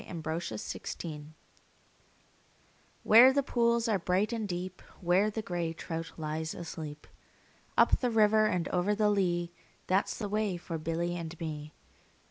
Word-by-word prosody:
A - - -8
Boy's 160 -8 -4
Song 155 -2 -6 1.7
WHERE 235 +5 +8
the 280 +1 +1
pools 235 -2 +2
are 210 -4 +2
bright 185 +6 +1
and 220 -2 -2
deep, 180 0 -5 0.2
Where 185 +4 +3
the 220 +1 -4
grey 175 -5 -2
trout 165 0 -5
lies 160 0 -3
asleep, 155 -3 -7 0.7
Up - - +5
the 250 - +1
river 215 -1 +4
and 180 -4 0
over 185 +3 +1
the 210 0 +3
lea, 175 -4 0 0.3
That 190 +2 +2
's - - -4
the 210 - -3
way 205 -2 -1
for 170 -1 -5
Billy 165 +2 -2
and 165 -1 -6
me. 150 -2 -6
175 Hz, 150 wpm, -30 LUFS, 165-210 Hz, 1.7 s, WHERE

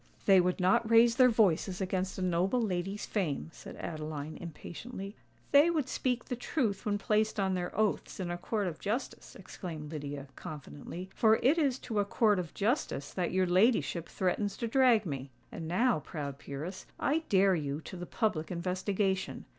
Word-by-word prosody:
"They 190 -2 +7
would 180 +1 0
not 220 +5 +3
raise 230 +1 +6
their 255 -1 +7
voices 190 -4 +2
against 190 0 -2
a 190 - -2
noble 185 +6 +1
lady's 195 -2 -2
fame," 165 -6 -2
said - - -10
Adeline, 155 -1 -5
impatiently. 195 +5 -8 0.4
"They 285 +4 +7
would 310 -6 0
speak 250 -1 -1
the 250 - -3
truth 230 -5 -1
when 205 -1 +1
placed 215 +1 +1
on 190 -1 +1
their 180 -1 -1
oaths 215 -2 0
in 180 -2 -2
a 175 - -2
court 205 +2 -1
of 170 -4 -4
justice," 225 +6 -4
exclaimed 160 -5 -7
Lydia, 145 -2 -5
confidently; 155 +5 -8
"for 220 -1 +5
it 295 +7 +4
is 275 -5 +2
to 225 -5 -3
a - - +4
court 210 -1 +3
of 170 -3 -6
justice 210 - -1
that 180 -2 -1
your 185 0 +2
ladyship 185 -2 +2
threatens 195 +2 -1
to 235 - -2
drag 245 -3 +4
me. 140 -4 -4 0.2
And 165 - -6
now, 225 +4 +2
proud 140 -2 -6
peeress, 155 +7 -6
I 300 +3 +2
dare 195 0 +5
you 145 -3 -2
to 185 - -9
the 175 0 -6
public 190 -9 -1
investigation! 185 +2 -1
190 Hz, 180 wpm, -31 LUFS, 170-220 Hz, 0.4 s, They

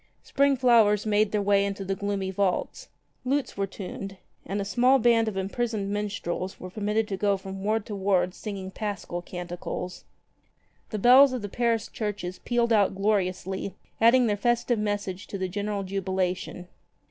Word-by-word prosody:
Spring 280 0 +2
flowers 225 -5 +4
made 210 0 +2
their 210 -1 0
way 200 0 +4
into 200 -1 -3
the 195 - -1
gloomy 195 -1 -2
vaults. 190 -1 -1 0.3
Lutes 275 +2 -1
were 195 0 -1
tuned 195 0 -7 0.3
and 200 +2 -2
a 200 - -2
small 245 +7 +4
band 230 -2 +3
of 210 -3 -3
imprisoned 200 +1 -2
minstrels 200 -3 -3
were 185 - -8
permitted 210 +2 0
to 195 - -2
go 200 0 +2
from 195 0 -8
ward 215 0 0
to 210 - -5
ward 190 -2 +1
singing 195 -3 -6
Paschal 195 -4 -4
canticles. 175 0 -6 0.9
The 215 - -3
bells 255 +5 +7
of 250 -4 -3
the 205 - -4
Paris 230 -1 0
churches 205 -4 -4
pealed 235 -1 +1
out 200 -3 +3
gloriously, 190 -1 -1 0.3
adding 240 +2 +6
their 210 -2 +2
festive 240 +2 +1
message 205 -2 -3
to 200 - -5
the 190 -1 -2
general 205 +1 -3
jubilation. 185 -2 -2
205 Hz, 165 wpm, -27 LUFS, 190-220 Hz, 0.9 s, bells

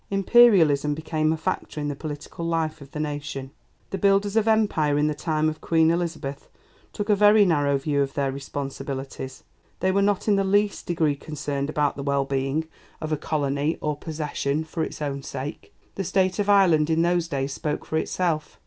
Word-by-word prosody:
Imperialism 190 -9 +5
became 155 0 0
a 160 - 0
factor 155 -1 -3
in 145 - -2
the 145 - -3
political 150 +2 -7
life 165 -2 -1
of 140 - -11
the 150 - -7
nation. 145 -3 -4 0.4
The 195 - -3
builders 200 +1 +2
of 225 -1 +2
Empire 200 -10 +2
in 150 - +2
the 150 - +1
time 155 0 0
of 155 0 -3
Queen 160 -1 +3
Elizabeth 165 -5 -3 0.4
took 205 - -4
a 210 - +4
very 210 +1 +6
narrow 145 -5 +2
view 140 +1 0
of 135 -1 -2
their 140 -2 0
responsibilities; 135 -1 -6 0.4
they 190 - +2
were 200 +1 +2
not 200 +1 +1
in 205 -2 +4
the 195 - +2
least 205 +1 +1
degree 160 -5 +1
concerned 145 -1 -4
about 150 -2 0
the - - -4
well 140 0 0
being 135 +3 -1 0.3
of 155 - -5
a - - +3
colony 145 0 -1
or 150 -1 -1
possession 150 -1 -3
for 160 0 -3
its 155 - -5
own 140 -1 -3
sake. 140 +3 -7 0.2
The 195 - -3
state 185 +1 +1
of 205 0 0
Ireland 175 -6 +5
in 165 +1 +2
those 175 -1 +1
days 140 -3 -2
spoke 150 +1 -3
for 160 - -2
itself. 160 -2 -1
155 Hz, 195 wpm, -24 LUFS, 140-180 Hz, 0.4 s, very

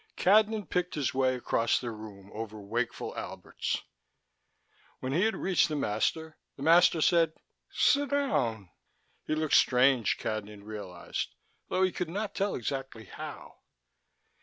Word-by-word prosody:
Cadnan 210 +2 +4
picked 180 0 -1
his 145 -4 -1
way 130 -1 +2
across 115 -2 +1
the 120 -2 -4
room 105 -3 -10
over 110 0 -6
wakeful 115 +4 -3
Alberts. - - -4 1.2
When 130 - -3
he 180 +7 +3
had 220 - +1
reached 185 -3 +2
the 155 - -2
master, 150 +6 -1 0.2
the 135 - -7
master 165 +1 +5
said: 165 -1 +4 0.4
"Sit 285 -1 +3
down." 130 - 0 0.6
He 155 - +1
looked 155 -1 -1
strange, 125 -2 +4
Cadnan 105 -1 -4
realized, 100 -5 -5 0.3
though 185 - +2
he 185 - +3
could 180 -2 -3
not 205 +3 -3
tell 200 +1 0
exactly 130 -2 -4
how. - - -9
135 Hz, 135 wpm, -30 LUFS, 110-180 Hz, 1.2 s, master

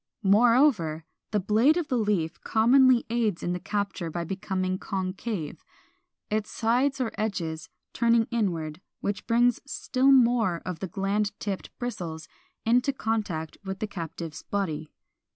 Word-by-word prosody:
Moreover, 210 - +4 0.2
the 210 - +1
blade 220 - +3
of 340 -4 -2
the 255 - +1
leaf 185 -7 0
commonly 250 +2 +5
aids 225 -6 0
in 175 - -1
the 180 - -3
capture 195 -3 -3
by 170 +2 -3
becoming 185 +1 -2
concave, 190 -3 -4 0.7
its 215 0 -1
sides 255 +5 +1
or 250 -3 -1
edges 170 -7 -3 0.2
turning 235 -1 +3
inward, 170 -8 -1 0.2
which 200 0 -3
brings 240 +1 +3
still 270 -1 +1
more 235 -9 +4
of 180 -3 -4
the 190 - -3
gland 200 +3 -1
tipped 200 -3 -4
bristles 170 -10 -5 0.4
into 245 +4 +3
contact 210 - -3
with 190 -1 -4
the 215 - -2
captive's 165 -4 -6
body. 160 -6 -3
205 Hz, 135 wpm, -27 LUFS, 175-235 Hz, 0.7 s, commonly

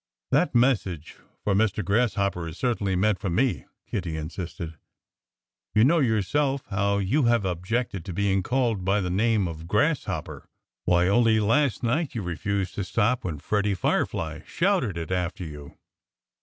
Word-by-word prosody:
"That - - +2
message 105 - +1 0.3
for 100 - +1
'Mr. 105 -1 +1
Grasshopper' 100 -4 +1
is 80 - -8
certainly 105 -6 0
meant 100 +1 +2
for 100 -2 -2
me," 120 +9 0 0.2
Kiddie 85 -6 -3
insisted. 80 0 -6 1.0
"You 110 - +6
know 165 +7 +4
yourself 135 - +1
how 100 +1 +1
you 110 +9 +1
have 120 -3 +3
objected 95 +2 -2
to 95 - -5
being 95 +1 +1
called 120 -2 0
by 100 +3 +2
the 90 -2 -2
name 105 0 +2
of 80 0 -7
'Grasshopper.' 135 - -1 0.4
Why, 90 0 +3
only 110 +2 +4
last 125 +5 +2
night 135 +5 0
you 110 - -2
refused 95 +2 -2
to 100 - -3
stop 110 +6 +1
when 80 -5 -3
Freddie 105 +5 0
Firefly 80 -3 -1
shouted 170 - +1
it 80 +1 -5
after 90 0 -2
you." 75 -3 -9
100 Hz, 155 wpm, -26 LUFS, 90-115 Hz, 1.0 s, You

